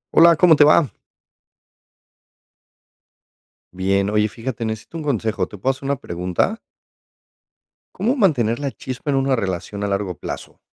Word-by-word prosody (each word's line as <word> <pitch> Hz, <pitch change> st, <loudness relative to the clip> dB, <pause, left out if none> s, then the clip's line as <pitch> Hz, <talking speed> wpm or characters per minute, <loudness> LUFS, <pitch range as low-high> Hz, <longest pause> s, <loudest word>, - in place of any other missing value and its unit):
Hola, 170 Hz, +1 st, +8 dB
¿cómo 160 Hz, +1 st, +6 dB
te 145 Hz, -, +6 dB
va? 150 Hz, -1 st, +4 dB, 2.8 s
Bien, 95 Hz, +2 st, +1 dB
oye, 105 Hz, 0 st, +2 dB
fíjate, 115 Hz, +1 st, -5 dB
necesito 110 Hz, +8 st, -5 dB
un -, -, -6 dB
consejo, 115 Hz, -6 st, -1 dB
¿te 105 Hz, -, -11 dB
puedo 130 Hz, +8 st, +1 dB
hacer 135 Hz, +1 st, -9 dB
una 140 Hz, +1 st, +1 dB
pregunta? 90 Hz, -, -2 dB, 1.4 s
¿Cómo 225 Hz, +8 st, 0 dB
mantener 135 Hz, -, +2 dB
la 140 Hz, -1 st, -2 dB
chispa 130 Hz, +3 st, -5 dB
en 135 Hz, -, +1 dB
una 135 Hz, -1 st, +2 dB
relación 100 Hz, 0 st, -4 dB
a -, -, 0 dB
largo 100 Hz, -2 st, -2 dB
plazo? -, -, -7 dB
125 Hz, 140 wpm, -21 LUFS, 100-145 Hz, 2.8 s, Hola